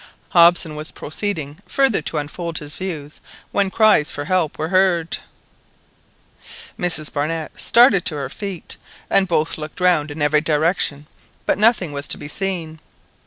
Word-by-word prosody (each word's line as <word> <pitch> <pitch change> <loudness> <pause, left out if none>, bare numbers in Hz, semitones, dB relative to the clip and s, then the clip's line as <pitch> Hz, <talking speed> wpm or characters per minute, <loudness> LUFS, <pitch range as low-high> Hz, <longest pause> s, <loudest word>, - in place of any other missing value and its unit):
Hobson 170 -2 +4
was 155 +1 -4
proceeding 155 -3 -5
further 270 -6 +2
to 160 - -3
unfold 160 +3 -4
his 150 0 -6
views 155 -6 -6 0.3
when 200 -1 +2
cries 215 -7 +4
for 145 - -5
help 175 -3 0
were 155 +1 -3
heard. 185 -3 +1 1.6
Mrs 165 -4 0
Barnett 155 +2 -3
started 235 -6 +5
to 155 - +2
her 140 -2 -3
feet, 190 +4 -7 0.3
and 195 -1 +5
both 165 -2 0
looked 155 +2 -8
round 175 -5 +2
in 145 +2 -8
every 150 +1 +3
direction, 155 -1 0 0.4
but - - 0
nothing 210 -7 +3
was 140 0 -4
to - - +3
be - - -8
seen. 165 -2 -3
165 Hz, 150 wpm, -20 LUFS, 150-185 Hz, 1.6 s, started